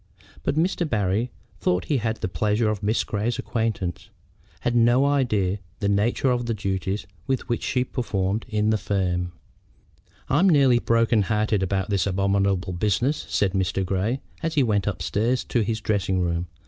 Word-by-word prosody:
But - - -1
Mr. 170 0 +1
Barry, 105 +1 0 0.3
though 90 - +2
he 140 - -1
had 110 -1 -1
the - - -2
pleasure 105 +5 +1
of 105 - -4
Miss 105 +3 +1
Grey's 110 +3 -2
acquaintance, 110 -6 -2 0.5
had 120 - 0
no 120 +3 +4
idea 120 -10 +2
of 100 - -5 0.2
the 100 -2 0
nature 110 +6 +2
of 120 -1 -1
the 115 - 0
duties 95 0 -2 0.2
which 125 -3 -1
she 125 - 0
performed 105 -5 -2
in 105 -1 +1
the 110 - +1
firm. 90 -3 -1 1.0
"I'm 185 +6 +4
nearly 135 -6 +5
broken 115 -1 +2
hearted 105 0 +1
about 95 +2 -1
this 100 0 +1
abominable 100 -1 +1
business," 105 - 0
said 95 -2 +1
Mr. 95 0 0
Grey, 100 +8 -1 0.2
as 165 -1 -2
he 145 - +4
went 105 -4 +1
upstairs 105 +7 0
to 120 - 0
his 110 +1 -1
dressing 100 -3 0
room. 85 0 -1
105 Hz, 165 wpm, -24 LUFS, 95-120 Hz, 1.0 s, nearly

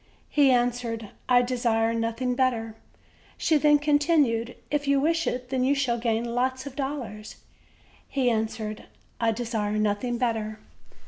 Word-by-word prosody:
He 285 -2 +4
answered: 240 -3 0 0.2
"I 245 0 +6
desire 235 -2 +1
nothing 230 +2 -1
better." 240 -4 0 0.6
She 315 - +3
then 295 0 +5
continued: 290 -6 +2 0.2
"If 290 -1 -1
you 280 0 +4
wish 330 +3 +1
it, 250 0 -3
then, 260 -1 +1
you 275 +2 +3
shall 250 -4 0
gain 230 0 0
lots 260 +2 -1
of 280 -2 -8
dollars." 265 -7 -5 0.7
He 265 -3 0
answered: 220 -2 -2 0.3
"I 230 -1 +2
desire 220 -2 -2
nothing 215 +3 0
better." 225 -3 -1
245 Hz, 140 wpm, -26 LUFS, 225-270 Hz, 0.7 s, I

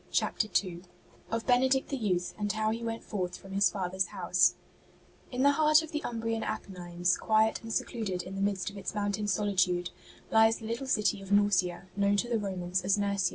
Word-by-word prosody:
CHAPTER 215 - 0 0.2
II 175 -1 -7 0.5
OF 230 0 -2
BENEDICT 260 +1 +3
THE 280 - -1
YOUTH, 185 -8 -1
AND 205 -1 0
HOW 215 0 0
HE 230 +1 -3
WENT 230 0 -4
FORTH 180 -3 -4
FROM 195 - -13
HIS 200 +1 +3
FATHER'S 190 -1 -1
HOUSE - - +2 0.8
In 255 +1 -1
the 285 - +6
heart 305 +1 +4
of 320 - -9
the 300 - -2
Umbrian 225 -1 -2
Apennines, 180 -4 -2
quiet 220 0 +2
and 225 - -8
secluded 200 -6 -2
in 185 - -8
the 195 - -4
midst 200 -1 -1
of 200 - -11
its 195 - -5
mountain 205 0 -1
sohtude, 185 -3 +1 0.4
Hes 220 0 +5
the 225 - -10
Uttle 265 +3 -5
city 210 -5 +1
of 195 - -10
Norcia, 200 -4 +2
known 200 0 +2
to 240 - 0
the 235 -2 0
Romans 185 -2 -2
as 195 +2 +2
Nursia. 200 -2 +1
205 Hz, 200 wpm, -30 LUFS, 190-225 Hz, 0.8 s, the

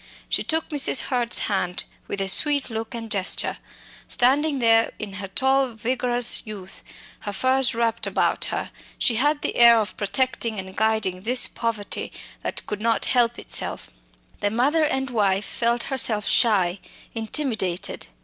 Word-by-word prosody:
She - - +1
took 320 0 -1
Mrs. 285 -3 +3
Hurd's 245 -3 0
hand 185 -3 -1 0.2
with 200 - -4
a 195 - -1
sweet 285 +6 +3
look 225 +2 -5
and 225 -2 -7
gesture. 195 -3 0 0.5
Standing 280 +4 +2
there 230 -2 +3
in 205 -2 -7
her 195 - -5
tall 265 +6 +1
vigorous 245 +1 +2
youth, 200 -4 -9 0.4
her 205 - -5
furs 260 +4 +1
wrapped 230 -1 -1
about - - 0
her, - - -4 0.3
she 230 - +1
had 290 +4 +1
the - - -2
air 235 -1 +8
of 200 -4 -3
protecting 230 +1 -1
and 190 0 -7
guiding 220 -4 0
this 245 +5 +4
poverty 225 -3 -3 0.3
that - - -3
could 210 0 -5
not 230 0 +1
help 240 -2 +1
itself. - - -3 0.5
The 205 - 0
mother 280 +9 +2
and 265 -3 -2
wife 200 -3 +1
felt 235 0 0
herself 225 -6 0
shy, 195 -6 +2 0.3
intimidated. 220 - -2
230 Hz, 150 wpm, -23 LUFS, 205-260 Hz, 0.5 s, air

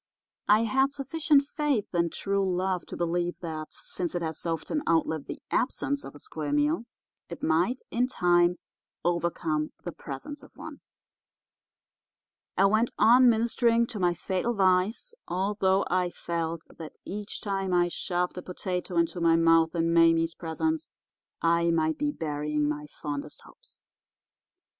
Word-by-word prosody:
I 210 +2 +5
had 265 +5 +2
sufficient 290 +1 +2
faith 285 -8 -1
in 170 -1 +2
true 200 +3 -1
love 185 0 -1
to - - -7
believe 175 +1 -1
that 155 -3 -5
since 180 -1 -4
it 175 - -1
has 160 -1 -4
often 165 - -2
outlived 160 -2 +1
the - - -7
absence 280 +2 0
of - - -10
a - - -11
square 150 -1 -5
meal 150 +8 +1 0.4
it 170 - -8
might, 175 +11 +1
in 245 +2 +1
time, 175 -6 +3 0.5
overcome 170 -3 0
the 175 - -4
presence 155 - -7
of - - -16
one. - - -9 1.8
I 195 - +5
went 220 +4 +3
on 245 +2 +7
ministering 235 +1 +3
to 210 - -4
my 175 -1 +2
fatal 190 +7 -1
vice, 195 - +2
although 190 +1 +1
I 180 0 +1
felt 165 -1 -4
that 160 -2 -8
each 205 +2 -5
time 195 -2 -2
I 175 -1 +3
shoved 180 +1 -2
a - - -6
potato 180 -1 -4
into 170 +1 +1
my 165 -1 +5
mouth 165 0 +4
in 165 0 +1
Mame's 165 0 +4
presence 310 - -2 0.5
I 170 0 +3
might 160 -1 +1
be 295 0 +1
burying 150 - -1
my 150 0 -3
fondest 145 -1 -6
hopes. - - -17
175 Hz, 150 wpm, -28 LUFS, 165-215 Hz, 1.8 s, on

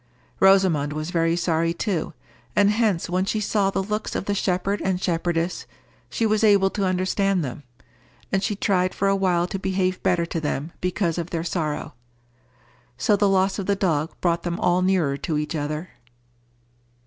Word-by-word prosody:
Rosamond 185 -7 +4
was 155 +3 -4
very 165 -1 +2
sorry 165 -1 0
too, 180 -5 -2 0.4
and 205 0 +4
hence 210 -6 +1
when 180 +2 0
she 215 +2 -1
saw 205 -1 +1
the 195 - -1
looks 210 +2 -3
of - - -2
the 205 - 0
shepherd 195 +1 0
and 190 -1 0
shepherdess, 170 -1 -1 0.4
she 230 - -1
was 215 0 +1
able 200 -2 +5
to 200 - -1
understand 185 -1 +1
them. 130 +2 -6 0.7
And 195 - +1
she 210 0 0
tried 185 -2 +1
for 195 - 0
a 195 - +3
while 180 -3 +1
to 190 +2 -4
behave 185 -1 -1
better 170 -2 +1
to 165 -1 -4
them 150 +1 -3
because 175 -2 -1
of 170 0 -4
their 165 -1 -2
sorrow. 160 -6 -3 1.0
So 210 - +3
the 205 0 +2
loss 190 +1 +2
of 195 - -4
the 200 - +2
dog 165 -5 0
brought 170 -1 +1
them 175 0 -3
all 180 +1 +2
nearer 180 -7 +1
to 155 +2 -2
each 150 +2 -2
other. 150 +3 -3
185 Hz, 180 wpm, -23 LUFS, 165-195 Hz, 1.0 s, able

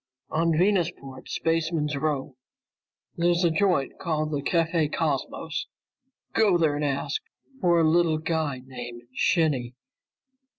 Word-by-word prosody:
"On 165 +1 +2
Venusport's 170 -8 0
Spaceman's 165 -2 0
Row. 140 -2 -2 0.8
There's 175 +1 +2
a 170 - +4
joint 180 -5 +1
called 155 -3 -1
the 145 -2 -1
Café 165 0 +1
Cosmos. 160 +1 -2 0.7
Go 205 -5 +4
there 160 -3 +2
and 150 - -2
ask 140 - -1 0.4
for 175 -4 +3
a 160 - +4
little 165 -1 +3
guy 155 -4 -2
named 120 -2 -8
Shinny. 135 -7 +1
160 Hz, 120 wpm, -26 LUFS, 140-170 Hz, 0.8 s, a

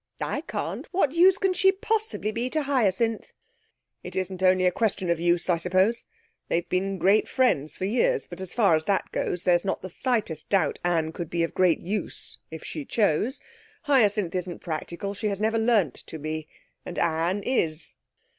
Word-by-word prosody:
'I - - -2
can't. - - -4
What 355 -7 +2
use 360 +4 +5
can 385 -2 +1
she 385 +1 +4
possibly 425 - -1
be 235 +3 -2
to 310 +2 -1
Hyacinth?' 230 -5 0 0.7
'It - - -8
isn't 185 0 -3
only 185 0 +4
a 180 - +4
question 195 -4 0
of 170 - 0
use, 175 0 +1
I 175 -2 +3
suppose. 185 +7 +3 0.4
They've 170 0 -1
been 195 +1 -1
great 195 +4 +3
friends 155 - +1
for 185 - -3
years, 465 - +1
but 175 +1 -9
as 190 - -5
far 200 -8 +4
as 155 0 -2
that 200 -1 0
goes, 180 - -2
there's 175 -1 +3
not 195 - -2
the 185 - -7
slightest 210 - -2
doubt 195 -2 +1
Anne 165 -3 +1
could 170 -1 -6
be 170 -1 0
of 165 - -2
great 180 -3 +3
use 200 +1 -4
if 160 0 -8
she 305 - -6
chose. 220 - 0 0.4
Hyacinth 210 - +2
isn't 180 -1 -3
practical, 170 +4 -4
and 210 +1 -2
has 200 -1 -3
never 220 +1 +1
learnt 220 - +2
to 160 - -9
be, 155 0 -5 0.4
and 175 - -8
Anne 170 +5 0
is.' 160 -11 -1
190 Hz, 185 wpm, -26 LUFS, 170-230 Hz, 0.7 s, use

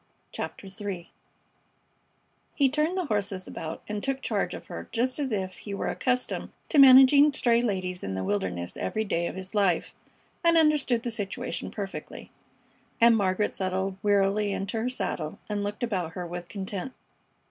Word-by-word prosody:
CHAPTER - - -6
III 195 -3 -6 1.4
He 275 -2 +4
turned 305 +6 0
the 365 - 0
horses 200 -6 -2
about 160 0 -6
and 210 -1 -3
took 270 -1 -1
charge - - -1
of - - -9
her - - -8
just 255 +4 0
as 275 -3 -1
if 190 -3 -2
he 200 -2 -6
were - - -2
accustomed 250 -1 -1 0.2
to 300 - +4
managing 270 +2 +9
stray 235 -3 +3
ladies 185 -5 -2
in 95 - -3
the 95 - -2
wilderness 95 -3 -2
every 220 - -1
day 170 -5 -1
of - - -6
his 190 +1 -7
life 195 -5 +1 0.5
and 335 -1 +5
understood 295 -7 +3
the 240 - -2
situation 225 +3 -4
perfectly; 200 -2 -7 0.7
and 230 -1 +7
Margaret 200 0 +1
settled 190 0 -1
wearily 205 0 +2
into 200 +4 -2
her 245 - 0
saddle 160 -10 -3
and 205 -1 -2
looked 205 +3 -4
about 185 -8 -2
her 180 - -5
with 175 0 -6
content. 195 +5 -5
205 Hz, 165 wpm, -27 LUFS, 185-250 Hz, 1.4 s, managing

